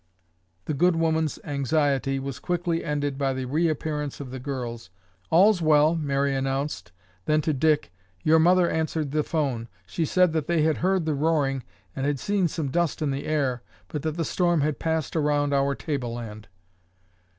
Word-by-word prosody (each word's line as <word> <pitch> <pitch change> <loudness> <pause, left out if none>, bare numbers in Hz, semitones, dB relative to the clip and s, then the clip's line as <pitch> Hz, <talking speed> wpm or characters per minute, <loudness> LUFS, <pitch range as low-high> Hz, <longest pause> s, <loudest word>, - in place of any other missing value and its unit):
The - - -2
good 175 +4 +3
woman's 160 -2 +1
anxiety 140 -2 0
was 135 -1 -5
quickly 175 -2 -1
ended 145 -2 -2
by 135 -1 +1
the 130 0 -3
reappearance 150 0 -1
of 135 -3 -7
the 130 - -6
girls. 120 -5 -5 0.4
"All's 190 +3 +5
well!" 155 0 +5
Mary 140 -3 0
announced. 135 -6 -2 0.3
Then 155 0 +3
to 155 +1 0
Dick, 150 - +1 0.3
"Your 160 +1 +5
mother 175 +2 +5
answered 160 -3 -1
the 155 +1 +1
phone. 135 -8 -2 0.2
She 130 - -2
said 180 +1 +3
that 155 -3 -1
they 170 -3 +2
had 155 -1 +2
heard 185 -2 +1
the 155 - +1
roaring 145 -3 +1 0.3
and 135 +1 -1
had 145 -2 0
seen 200 +1 +1
some 155 -5 -3
dust 170 -1 0
in 145 - 0
the 135 +1 -4
air 135 -6 0 0.3
but 150 - -4
that 155 +1 -3
the 165 - 0
storm 175 -2 +1
had 150 +1 -1
passed 160 -2 -1
around 145 -2 +1
our 140 0 +2
tableland." 120 - -5
150 Hz, 175 wpm, -25 LUFS, 135-160 Hz, 0.4 s, All's